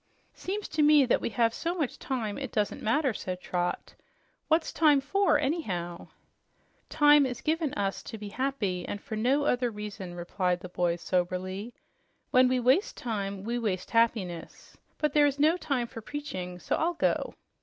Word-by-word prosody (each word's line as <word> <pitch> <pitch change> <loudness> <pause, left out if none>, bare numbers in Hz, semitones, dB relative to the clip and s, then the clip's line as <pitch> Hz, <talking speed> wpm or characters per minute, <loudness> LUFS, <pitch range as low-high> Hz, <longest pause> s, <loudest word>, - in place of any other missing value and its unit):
"Seems 405 +3 -4
to 310 - 0
me 295 -2 +6
that 245 - +2
we - - -1
have 230 0 +2
so 340 +7 -2
much 305 -8 -2
time 225 -6 -3
it 270 -4 -5
doesn't 210 -1 -1
matter," 255 +3 +1
said 185 -2 -5
Trot. 180 -1 -3 0.5
"What's 320 +1 +2
time 300 -3 +5
for, 380 +5 +2
anyhow?" 200 - -2 0.8
"Time 295 -1 +6
is 250 -1 -5
given 315 0 0
us 195 -1 -1
to 225 - -7
be 210 -1 -7
happy, 210 -8 -2
and 205 - -4
for 220 - -6
no 255 +7 +2
other 245 -3 +1
reason," 205 -4 -7
replied 180 +1 -1
the 180 - -8
boy 175 -1 0
soberly. 185 +5 -2 0.6
"When 255 0 +6
we 255 0 +2
waste 260 - +2
time, 200 -4 -3
we 235 +3 -2
waste 185 -5 -2
happiness. 215 -7 -1 0.2
But 300 -2 0
there 295 -1 +5
is 280 -1 -1
no 310 +4 +4
time 275 -8 -1
for 230 -1 -9
preaching, 190 -9 -6
so - - -1
I'll 340 +2 0
go." - - 0
235 Hz, 175 wpm, -28 LUFS, 190-290 Hz, 0.8 s, me